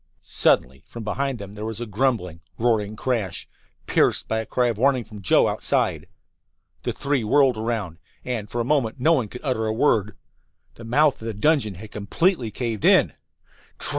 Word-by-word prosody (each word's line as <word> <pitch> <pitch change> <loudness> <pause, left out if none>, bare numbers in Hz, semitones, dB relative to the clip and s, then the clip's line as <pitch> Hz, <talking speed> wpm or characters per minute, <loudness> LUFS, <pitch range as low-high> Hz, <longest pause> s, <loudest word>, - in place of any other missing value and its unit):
Suddenly 65 +1 +1
from 115 - -8
behind 135 +5 -2
them 100 -2 -9
there 105 0 -7
was 110 0 -4
a 120 - -3
grumbling, 105 -7 -1 0.2
roaring 110 -3 +1
crash, 110 -7 -2 0.4
pierced - - +2
by 110 - 0
a 110 - -5
cry 125 - +1
of 110 -3 -4
warning 130 -1 +3
from 105 -2 -11
Joe, 90 - +4
outside. - - 0 0.7
The - - -2
three 140 -3 -1
whirled 135 +3 +4
around, 110 -6 -3 0.3
and 115 -5 -3
for 120 - -3
a - - +1
moment 135 -4 0
no 160 +6 +4
one 130 -9 +1
could 125 +4 -10
utter 125 -6 -1
a - - 0
word. 110 -5 +1 0.6
The 115 - -12
mouth 140 +4 +2
of 110 - -6
the 110 - -4
dungeon 115 -4 +2
had 105 +4 -11
completely 125 - 0
caved 115 -1 -4
in! - - +5
115 Hz, 180 wpm, -23 LUFS, 105-130 Hz, 0.7 s, in